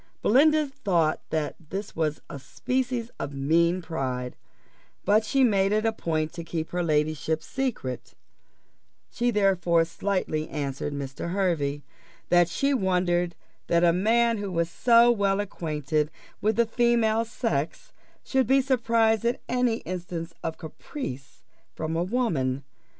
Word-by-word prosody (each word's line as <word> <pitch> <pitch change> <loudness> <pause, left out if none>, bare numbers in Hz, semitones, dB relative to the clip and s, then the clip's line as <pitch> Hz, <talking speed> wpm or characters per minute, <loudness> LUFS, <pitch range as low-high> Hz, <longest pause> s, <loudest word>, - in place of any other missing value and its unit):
Belinda 305 +6 +5
thought 185 - 0
that 155 -2 -1
this 200 +2 -5
was 155 -2 -1
a 140 - -7
species 245 - -2
of 140 0 -4
mean 170 +6 +2
pride; 130 -6 -3 0.7
but 215 +2 +4
she 270 +5 +2
made 200 -5 +3
it 215 +1 +1
a 225 - +2
point 160 -6 -2
to 170 -1 -6
keep 165 -1 -4
her 180 - -1
ladyship's 155 0 0
secret 245 - -4 1.0
she 240 +1 0
therefore 185 -6 +3
slightly 165 -2 -2
answered 140 -1 -3
Mr. 140 +4 -5
Hervey, 150 -7 0 0.5
"that 175 -1 +5
she 275 +10 +1
wondered 180 -5 +1 0.3
that 170 0 +3
a 170 -1 +5
man 230 +4 +2
who 200 -2 -4
was 170 -1 -1
so 235 0 +5
well 200 -3 +1
acquainted 155 -6 -2 0.3
with 215 +1 +2
the 235 - +3
female 230 -1 +2
sex 220 - -3 0.3
should 265 -1 +1
be 270 +1 +5
surprised 230 -4 +2
at 240 +2 0
any 245 -2 +1
instance 175 -2 -5
of 165 -1 -3
caprice 155 - -8 0.3
from 160 0 -3
a 165 - +1
woman." 165 - 0
180 Hz, 140 wpm, -26 LUFS, 155-230 Hz, 1.0 s, Belinda